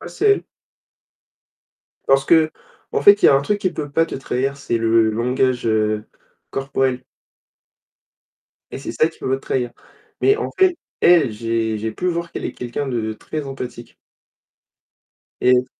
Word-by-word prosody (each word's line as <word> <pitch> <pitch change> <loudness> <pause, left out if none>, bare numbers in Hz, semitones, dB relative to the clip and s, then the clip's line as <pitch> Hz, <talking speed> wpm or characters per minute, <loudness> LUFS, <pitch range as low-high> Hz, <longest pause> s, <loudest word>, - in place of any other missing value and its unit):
Ah, - - -8
c'est 425 - -1
elle. 405 - +2 1.6
Parce 135 0 +4
qu'en 160 0 0
fait, 205 0 +7
il - - +8
y - - +8
a - - +6
un 135 - +3
truc 205 +7 0
qui 185 -2 -1
peut 145 -3 -5
pas 165 +3 +2
te - - -7
trahir, 135 +1 -2
c'est 120 -4 -2
le 115 -1 +3
langage, 125 +2 0
heu, 110 -1 +1 0.5
corporel. 135 -1 -1 1.7
Et - - -5
c'est 135 - -6
ça 155 - +3
qui 165 - -17
peut - - -4
pas 135 - +2
te 135 - -11
trahir, 125 -2 -1 0.5
mais 410 - +4
en 445 - -3
fait, 370 -2 +4 0.2
elle, 170 -7 +5
j'ai 115 0 -1
j'ai 110 +1 -3
pu 180 - -4
voir 170 -1 -3
qu'elle - - -5
est - - -3
quelqu'un 125 +3 -4
de 110 -3 -2
très 150 +7 -6
empathique. 125 -3 -8 1.5
Et 125 0 +4
135 Hz, 165 wpm, -20 LUFS, 115-155 Hz, 1.7 s, il